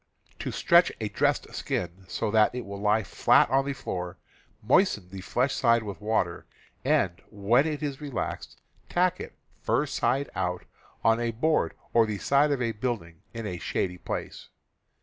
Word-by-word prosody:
To - - -3
stretch - - +4
a - - -2
dressed - - 0
skin 95 +2 -3
so 105 +2 -2
that 110 +2 +4
it 125 - -4
will 100 0 -7
lie 105 +1 +3
flat 95 - +4
on 135 +1 +3
the 140 - -1
floor, 90 -8 -5 0.5
moisten 110 - +3
the 95 -1 -7
flesh 130 +7 0
side 115 -2 +3
with 100 -1 -7
water, 105 -5 -1 0.4
and, 90 0 +1
when 115 +8 +2
it 150 -1 -3
is 140 -2 -3
relaxed, 140 -4 -5 0.3
tack 180 0 +2
it, - - -8 0.2
fur - - +1
side 140 +2 0
out, 90 0 -2 0.4
on 115 +1 +4
a 120 0 0
board 155 +8 +1 0.2
or 115 -1 +5
the 105 -1 -2
side 140 +6 +3
of 135 -3 0
a 115 - 0
building 105 -8 -4
in 115 -1 -5
a 90 -4 -4
shady 90 +3 -2
place. - - -6
110 Hz, 170 wpm, -27 LUFS, 95-135 Hz, 0.5 s, or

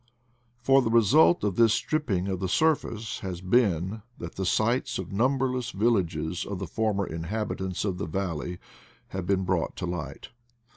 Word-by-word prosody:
For 135 +1 +5
the 115 - 0
result 120 - +5
of 100 -3 0
this 115 -2 +5
strip 155 +4 -1
ping 95 -3 0
of 95 -2 -2
the 95 -1 -2
surface 120 - 0
has 95 -3 -5
been 95 0 +1 0.2
that 85 - -7
the 95 -1 -3
sites 115 +6 +1
of 95 -3 -6
numberless 130 +2 +1
villages 90 -7 0
of 100 - -5
the 95 - -4
former 100 +2 0
inhabitants 95 +3 -3
of 95 -3 -2
the 80 - -3
valley 90 -1 -3 0.5
have 95 -2 -5
been 95 -1 +2
brought 90 -2 -1
to 90 - -4
light. 80 -6 -5
95 Hz, 165 wpm, -27 LUFS, 90-115 Hz, 0.5 s, For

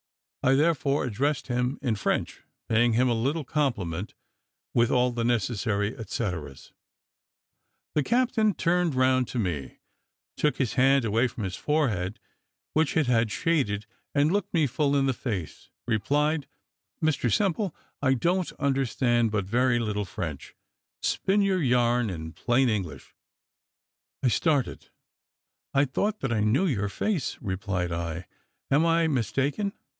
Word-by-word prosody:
I 130 +1 +4
therefore 145 -1 +2
addressed 135 +5 -1
him 125 +2 -1
in 125 -5 +1
French, 100 - -2 0.3
paying 115 +1 +3
him 125 +3 +3
a 120 - +2
long 140 +7 -1
compliment, 105 - -2 0.6
with 120 0 +3
all 125 0 +3
the 120 -1 -2
necessary 110 -3 0
et 110 -4 -9
ceteras. 80 - -4 1.2
The 150 - +2
captain 230 - +2
turned 175 -3 +1
round 130 -1 +3
to - - -5
me, 85 - -3 0.6
took 150 -4 +1
his 130 -5 0
hand 135 0 +4
away 115 +4 +2
from 115 -2 -7
his 95 -1 -3
forehead, 115 - 0 0.5
which 155 -1 +2
it 160 - +3
had 115 -2 +2
shaded, 110 - 0 0.3
and 145 +2 +3
looking 200 0 0
me - - +4
full 140 +2 +1
in 140 -1 +3
the 135 - +2
face, 105 - -5 0.2
replied, 145 +7 +1 0.6
"Mr 145 -7 +1
Simple, 195 - +1 0.3
I 135 -1 +3
don't 175 +7 0
understand 130 -4 +1
but 105 -3 -1
very 125 +4 +2
little 105 -3 -1
French. 75 -6 -6 0.5
Spin 200 +2 +1
your 190 -2 +1
yarn 120 -3 +2
in 80 -3 -6
plain 125 +5 +2
English." 100 -8 -3 1.1
I 130 - +4
started 145 +1 0 0.9
"I 140 +1 +5
thought 205 +11 -1
that 135 -3 -1
I 110 - +1
knew 110 - +2
your 105 - 0
face," 180 - -2
replied 95 -3 -2
I; 85 +1 -3 0.5
"am 145 +4 +4
I 165 0 +3
mistaken? 140 - 0
125 Hz, 140 wpm, -27 LUFS, 110-150 Hz, 1.2 s, I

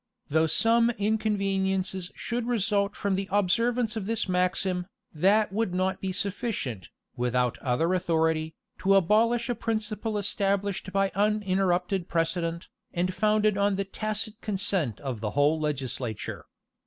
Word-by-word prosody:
Though 160 +2 +3
some 230 +7 +4
inconveniencies 195 -4 0
should 240 0 -3
result 210 -4 +1
from 200 -1 -1
the 195 +1 -2
observance 230 +4 +1
of 205 -3 -4
this 225 -2 0
maxim, 180 0 0 0.3
that 195 +5 +3
would 210 -4 -1
not 185 +1 0
be 190 - -2
sufficient, 190 - -3 0.3
without 125 0 0
other 145 +8 +1
authority, 160 -3 +1 0.2
to 195 +1 +3
abolish 225 +6 +3
a 245 - 0
principle 215 -1 -2
established 200 -1 -1
by 195 0 +1
uninterrupted 195 -3 +1
precedent, 165 0 -1 0.2
and 180 +2 -1
founded 210 +1 +2
on 200 0 +2
the 195 +1 -1
tacit 215 +2 -3
consent 190 - 0
of 130 -5 -4
the 105 0 -2
whole 150 +2 +4
legislature. 130 -6 -3
195 Hz, 130 wpm, -27 LUFS, 170-215 Hz, 0.3 s, some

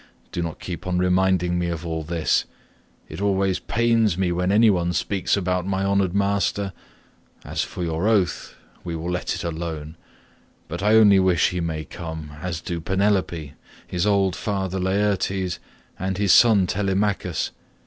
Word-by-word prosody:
Do 85 - -3
not 85 -2 -4
keep 90 0 -6
on 90 -1 0
reminding 90 -1 +2
me 85 - -1
of 85 0 -4
all 80 -1 -2
this; 80 0 0 0.6
it - - -8
always 95 -2 +1
pains 115 -5 +1
me 95 -2 +1
when 90 +2 0
any 110 +1 +5
one 90 -2 0
speaks 95 +4 0
about 90 -1 -1
my 95 0 0
honoured 100 -2 +1
master. 100 -1 0 0.7
As - - -2
for 90 - -5
your 85 +4 -1
oath 100 -6 0 0.3
we 85 -2 -4
will 85 +2 -4
let 90 - -2
it - - -5
alone, 80 -2 -5 0.7
but 85 +3 -5
I 105 +2 +4
only 105 -3 +7
wish 95 -3 +3
he 90 - -2
may 80 -2 -3
come, 80 -3 -7
as 90 -3 -3
do 85 0 -4
Penelope, 95 -5 0 0.3
his 90 +3 -1
old 100 -3 +2
father 95 -2 -2
Laertes, 95 -1 0 0.4
and 95 0 -2
his 100 -2 +4
son 110 -5 +6
Telemachus. 95 -2 -1
90 Hz, 160 wpm, -23 LUFS, 85-100 Hz, 0.7 s, only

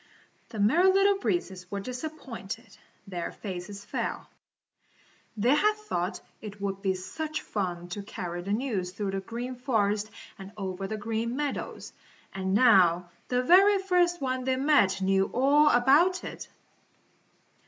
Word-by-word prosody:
The 225 - -8
Merry 320 - +4
Little 390 +1 +3
Breezes 190 - -2
were 200 - -3
disappointed. 240 -4 -7 0.3
Their 175 -3 -4
faces 200 +1 -7
fell. - - -4 1.1
They 235 +6 +3
had 425 +8 +3
thought 215 - -3 0.2
it 210 -1 -9
would 195 -1 -3
be 190 -2 0
such 310 +12 -5
fun 175 -4 -3
to 200 +4 -5
carry 175 -3 -5
the 195 +3 -5
news 210 -5 -1
through 200 0 -3
the 195 - -2
Green 235 +6 -5
Forest 215 -5 0 0.3
and 195 +1 -10
over 195 -1 -4
the 215 +2 -4
Green 225 +2 -2
Meadows, 290 -1 -4 0.4
and 190 0 -1
now 180 -7 +5 0.2
the 250 0 0
very 390 +8 +6
first 355 -2 +2
one 255 -1 -1
they 260 0 +1
met 260 -9 +3
knew 195 0 +2
all 285 +4 +5
about 295 +10 +4
it. - - -7
220 Hz, 145 wpm, -28 LUFS, 195-280 Hz, 1.1 s, very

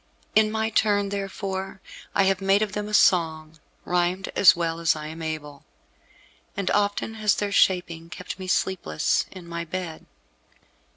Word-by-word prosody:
In 215 0 +4
my 220 +1 -1
turn, 205 -2 +2
therefore, 195 -1 -4 0.4
I 195 - +4
have 195 0 +1
made 195 +2 +3
of 210 - -3
them 210 +1 -4
a 210 - -7
song, 160 -4 +2 0.3
rhymed 180 +2 0
as 195 - +7
well 165 -1 -2
as 165 -2 +2
I 155 0 -6
am 160 +2 -7
able, 150 -3 -6 0.9
and 200 -2 -1
often 205 +2 0
has 210 -2 +3
their 205 -1 -2
shaping 175 -4 +1
kept 180 +1 -7
me 185 - -6
sleepless 80 - 0
in 185 -2 -11
my 170 0 -4
bed. 170 -1 -6
185 Hz, 160 wpm, -25 LUFS, 165-200 Hz, 0.9 s, as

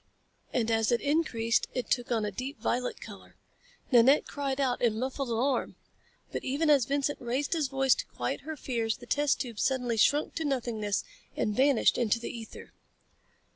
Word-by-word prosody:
And 230 -2 0
as 225 +1 +2
it 240 - +3
increased 250 -7 +1
it 250 - -3
took 245 0 0
on 225 -3 +1
a 205 - -2
deep 260 +8 -6
violet 250 +1 -1
color. - - -12 0.6
Nanette 255 +4 +6
cried 280 -1 -3
out 255 -3 0
in 225 -3 +2
muffled 260 +2 -3
alarm. 250 +4 0 0.6
But - - -4
even 300 +4 +1
as 275 -5 +5
Vincent 285 +2 -1
raised 255 +6 -1
his 315 -4 0
voice 270 -1 +3
to - - -5
quiet - - -4
her 315 -1 -6
fears 230 -5 -2
the 245 - -12
test 290 +3 +1
tube 235 -5 -6
suddenly 250 -3 0
shrunk 290 +7 +3
to 325 - -1
nothingness 235 -7 -1 0.3
and 210 - 0
vanished 270 -1 +3
into 230 -1 +2
the 240 +2 -6
ether. 225 -1 -10
255 Hz, 175 wpm, -29 LUFS, 230-280 Hz, 0.6 s, Nanette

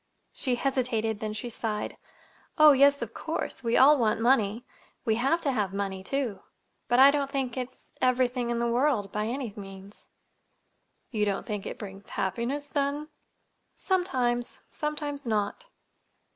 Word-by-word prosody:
She 255 -2 0
hesitated; 240 -5 -1
then 215 -1 -3
she 215 +3 -4
sighed. 220 -2 -3 0.6
"Oh, 305 -1 +9
yes, 280 +1 +5
of - - -8
course. - - -4
We 230 0 +2
all 285 +2 +7
want 220 -2 +2
money. 230 -1 +2 0.4
We 225 - +3
have 275 +7 +2
to 280 - +2
have 205 -6 -1
money, 195 -1 -3
too; 250 -3 -2 0.5
but 245 - +3
I 270 +2 +9
don't 280 -1 -1
think 270 -4 -2
it's—everything 250 -1 -1
in 240 - 0
the 235 - 0
world, 235 -4 +1
by 210 +1 -1
any 245 -2 -3
means." 195 -1 -11 1.0
"You 215 -3 0
don't 200 -1 -2
think 210 -4 -4
it - - -6
brings 200 -1 -9
happiness, 235 +10 -2
then?" 285 +1 -1 0.7
"Sometimes. 255 -11 0
Sometimes 295 -2 -3
not." 215 - -1
245 Hz, 145 wpm, -28 LUFS, 215-275 Hz, 1.0 s, Oh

